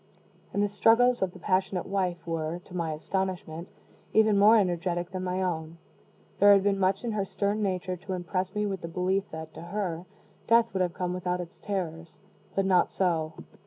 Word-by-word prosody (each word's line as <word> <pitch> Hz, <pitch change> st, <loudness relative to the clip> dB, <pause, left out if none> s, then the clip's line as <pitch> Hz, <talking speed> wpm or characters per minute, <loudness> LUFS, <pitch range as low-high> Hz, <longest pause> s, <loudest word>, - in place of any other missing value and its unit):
And 200 Hz, -, +1 dB
the -, -, +3 dB
struggles 230 Hz, +5 st, +4 dB
of 190 Hz, -2 st, +1 dB
the 185 Hz, -, -13 dB
passionate 185 Hz, 0 st, 0 dB
wife 185 Hz, -3 st, -2 dB
were, 165 Hz, 0 st, -2 dB
to 180 Hz, -, -11 dB
my 165 Hz, -3 st, -1 dB
astonishment, 180 Hz, 0 st, -3 dB, 0.5 s
even 215 Hz, -1 st, +5 dB
more 210 Hz, +3 st, +7 dB
energetic 175 Hz, -2 st, 0 dB
than 185 Hz, -1 st, -4 dB
my 185 Hz, +1 st, -1 dB
own. 165 Hz, -2 st, -3 dB, 0.6 s
There 205 Hz, +1 st, +8 dB
had 200 Hz, -1 st, +4 dB
been 200 Hz, -1 st, +1 dB
much 190 Hz, +2 st, +1 dB
in 235 Hz, -, -2 dB
her 210 Hz, -2 st, 0 dB
stern 200 Hz, +2 st, -1 dB
nature 185 Hz, -2 st, -1 dB
to 190 Hz, +2 st, -6 dB
impress 185 Hz, +1 st, -3 dB
me 210 Hz, 0 st, 0 dB
with 195 Hz, -3 st, -3 dB
the -, -, -5 dB
belief 185 Hz, +3 st, -1 dB
that, 160 Hz, 0 st, -8 dB
to 160 Hz, -, -9 dB
her, 175 Hz, -1 st, -4 dB, 0.4 s
death 230 Hz, 0 st, +4 dB
would 190 Hz, -, 0 dB
have 175 Hz, -2 st, 0 dB
come 180 Hz, -1 st, -2 dB
without 180 Hz, 0 st, -2 dB
its 175 Hz, +1 st, -8 dB
terrors; 170 Hz, -5 st, -4 dB, 0.4 s
but 195 Hz, -, +2 dB
not 185 Hz, -2 st, +4 dB
so. 165 Hz, -4 st, 0 dB
185 Hz, 195 wpm, -28 LUFS, 175-200 Hz, 0.6 s, There